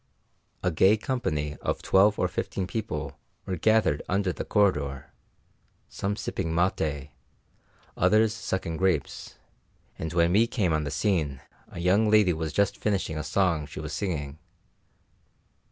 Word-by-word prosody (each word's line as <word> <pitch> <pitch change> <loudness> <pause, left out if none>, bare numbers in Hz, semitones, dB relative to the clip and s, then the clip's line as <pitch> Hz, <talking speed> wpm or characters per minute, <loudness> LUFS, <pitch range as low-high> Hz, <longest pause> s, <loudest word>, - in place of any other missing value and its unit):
A 90 - +1
gay 95 +6 +4
company 75 - -2
of - - -3
twelve 100 +2 +4
or - - +1
fifteen 95 - -3
people 75 -9 -5 0.3
were 95 - -2
gathered 110 -5 +2
under 95 -1 +1
the - - -5
corridor, 75 - 0 0.8
some 100 +1 -3
sipping 95 -5 -3
maté, 80 -5 -1 0.8
others 110 +4 +3
sucking 95 -6 -3
grapes; 90 -6 -1 0.6
and 80 - -4
when 85 0 +2
we 110 +5 +4
came 95 -9 0
on 75 -1 0
the - - -3
scene 80 -8 0 0.3
a - - -11
young 95 +5 +3
lady 105 -4 +5
was 80 -1 -3
just 100 +3 +1
finishing 100 -6 -1
a 75 - -3
song 80 -1 0
she - - -8
was - - -6
singing. 75 -6 -3
90 Hz, 140 wpm, -27 LUFS, 75-100 Hz, 0.8 s, lady